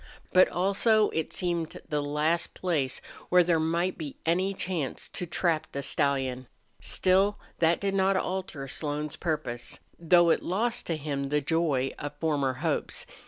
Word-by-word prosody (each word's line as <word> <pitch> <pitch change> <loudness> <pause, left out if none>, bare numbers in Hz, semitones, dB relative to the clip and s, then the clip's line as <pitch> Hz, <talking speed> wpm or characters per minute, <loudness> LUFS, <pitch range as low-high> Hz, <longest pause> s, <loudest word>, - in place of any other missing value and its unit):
But 185 0 +6
also 205 +4 +3
it 160 -1 -2
seemed 170 -3 -2
the 150 -1 0
last 150 +4 0
place 150 -8 -1 0.3
where 180 0 +6
there 170 -1 +2
might 170 +4 0
be 150 -4 -5
any 180 +4 +2
chance 170 -8 -2
to 180 - -5
trap 165 -2 0
the 140 - -3
stallion. 135 -3 0 0.3
Still 195 +2 +2 0.2
that 165 0 +3
did 200 -1 -1
not 195 0 +3
alter 180 -8 -3
Slone's 150 +1 -3
purpose, 145 -8 -3 0.2
though 170 0 +5
it - - +2
lost 230 +6 -1
to 165 - -1
him 140 -2 -3
the 150 +1 +2
joy 145 -3 +1
of 145 0 -5
former 145 -4 0
hopes. - - -1
165 Hz, 155 wpm, -28 LUFS, 145-185 Hz, 0.3 s, But